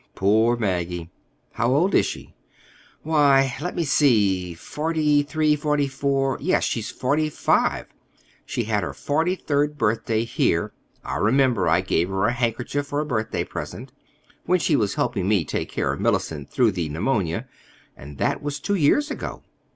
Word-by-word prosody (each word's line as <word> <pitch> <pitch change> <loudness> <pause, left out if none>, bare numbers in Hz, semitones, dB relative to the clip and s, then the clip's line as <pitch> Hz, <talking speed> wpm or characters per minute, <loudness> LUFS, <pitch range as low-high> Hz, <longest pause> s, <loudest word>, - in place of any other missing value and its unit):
Poor 110 +5 +3
Maggie!" 90 -5 -2 0.4
"How 120 - 0
old 180 +7 +2
is - - +4
she?" - - -8 0.7
"Why, 140 -4 +3
let 180 +3 -4
me 170 - 0
see—forty 140 - +1
three, 150 +1 +1
forty 150 -1 0
four—yes, 135 +4 0
she's 115 -3 -2
forty 150 +4 0
five. - - +1 0.6
She 120 - -3
had 105 -2 0
her 90 - -5
forty 160 +5 0
third 150 -3 -1
birthday 110 -1 0
here—I 70 - -2
remember 125 - +2
I - - +3
gave 85 +3 0
her 95 +1 0
a 115 - +2
handkerchief 120 +4 -2
for 145 +1 -2
a 150 - -1
birthday 110 -6 -2
present—when 145 +7 -5
she 160 -3 +1
was 105 -6 0
helping 110 -7 -1
me 100 -6 +2
take - - -3
care 70 -1 -1
of 70 - -6
Mellicent 75 -4 -1
through 120 -4 +2
the 85 -5 -3
pneumonia; 90 - -1 0.5
and 70 +1 -11
that - - 0
was 145 -1 -4
two 205 - -2
years 200 - +2
ago. - - -6
130 Hz, 150 wpm, -23 LUFS, 100-150 Hz, 0.7 s, is